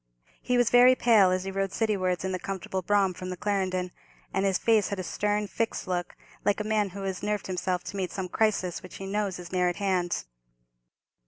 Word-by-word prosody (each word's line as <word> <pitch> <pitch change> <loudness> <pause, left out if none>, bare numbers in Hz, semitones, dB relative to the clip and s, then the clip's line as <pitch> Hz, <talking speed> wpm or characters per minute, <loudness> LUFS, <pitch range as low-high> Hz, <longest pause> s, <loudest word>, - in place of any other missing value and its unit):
He 250 -1 +1
was 245 -1 +3
very 250 +1 +7
pale 220 -7 +5
as 185 0 0
he 195 - -4
rode 195 0 -1
citywards, 190 -4 0
in 190 - -1
the 185 - -2
comfortable 190 0 -4
brougham, 195 0 +2
from 185 +1 -7
the 180 - -5
Clarendon; 185 -2 -1 0.4
and 195 +1 +1
his 190 -2 +2
face 220 -3 +3
had 200 - -3
a 185 - -3
stern, 210 +2 0
fixed 225 +1 -2
look, 175 -1 -2 0.3
like 205 - +2
a - - -1
man 215 -1 +1
who 195 +1 -7
has 190 -1 -3
nerved 210 -1 -1
himself 180 -1 -2
to - - -7
meet 185 -2 -1
some 190 -2 -3
crisis, 185 -3 0
which 185 - -11
he 195 - -7
knows 200 -1 -1
is 175 -1 -9
near 180 -1 +2
at 175 - -3
hand. 185 -3 0
195 Hz, 220 wpm, -28 LUFS, 185-210 Hz, 0.4 s, very